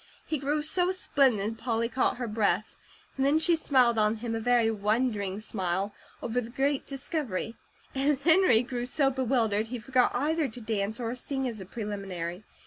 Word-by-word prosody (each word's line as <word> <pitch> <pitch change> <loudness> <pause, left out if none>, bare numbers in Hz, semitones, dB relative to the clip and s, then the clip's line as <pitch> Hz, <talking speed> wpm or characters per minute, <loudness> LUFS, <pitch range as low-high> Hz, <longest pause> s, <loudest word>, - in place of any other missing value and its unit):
He 310 - -2
grew 295 +2 -1
so 355 +4 +2
splendid, 225 - +1
Polly 230 -1 0
caught 250 +2 0
her 245 -1 -3
breath, 215 0 0 0.4
and 270 - -1
then 280 +3 +4
she 335 +2 +4
smiled 255 -7 +3
on 215 +1 +3
him 225 +1 -4
a 225 - -1
very 235 -1 +3
wondering 210 -2 0
smile, 195 -2 -2 0.3
over 240 +1 0
the 230 - -8
great 270 +3 -1
discovery; 270 - -2 0.4
and 275 +1 +2
Henry 320 -7 +5
grew 245 -1 -4
so 270 +1 +2
bewildered 230 -5 +1
he 245 +2 -4
forgot 250 +2 +2
either 305 +3 +1
to 245 0 -8
dance 215 0 -2
or 235 -1 -2
sing 265 +1 -2
as 225 -4 -5
a 185 - -9
preliminary. 195 -4 -5
240 Hz, 175 wpm, -28 LUFS, 215-270 Hz, 0.4 s, Henry